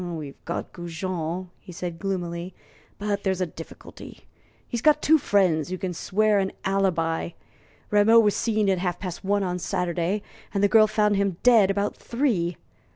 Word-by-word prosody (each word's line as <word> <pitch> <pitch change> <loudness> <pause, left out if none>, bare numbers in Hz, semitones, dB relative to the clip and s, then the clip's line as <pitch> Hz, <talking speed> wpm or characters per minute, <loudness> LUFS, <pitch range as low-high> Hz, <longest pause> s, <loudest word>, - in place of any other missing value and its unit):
"We've 160 -5 -7
got 170 - -4
Goujon," 175 0 -4
he - - -12
said, 170 -1 -6
gloomily, 175 -1 -4 0.4
"but 205 0 -2
there's 190 -2 0
a 185 - +1
difficulty. 165 -1 -11 0.5
He's 235 -3 -3
got 300 +2 +4
two 315 +1 +4
friends 180 - +2
who 185 - -3
can 185 -1 -3
swear 210 +4 +1
an 190 -1 -1
alibi. 175 -4 0 0.6
Rameau 210 +2 +5
was 210 -3 +3
seen 220 -2 +1
alive 190 -2 +2
at - - -5
half 180 -2 -2
past 180 -3 -6
one 200 +1 +1
on 180 -1 -2
Saturday, 180 +3 -1 0.3
and 200 - +1
the - - +6
girl 215 +2 +6
found 210 -1 +2
him 195 -3 0
dead 230 -6 +6
about 200 +1 -1
three. 210 - -1
190 Hz, 170 wpm, -25 LUFS, 175-205 Hz, 0.6 s, the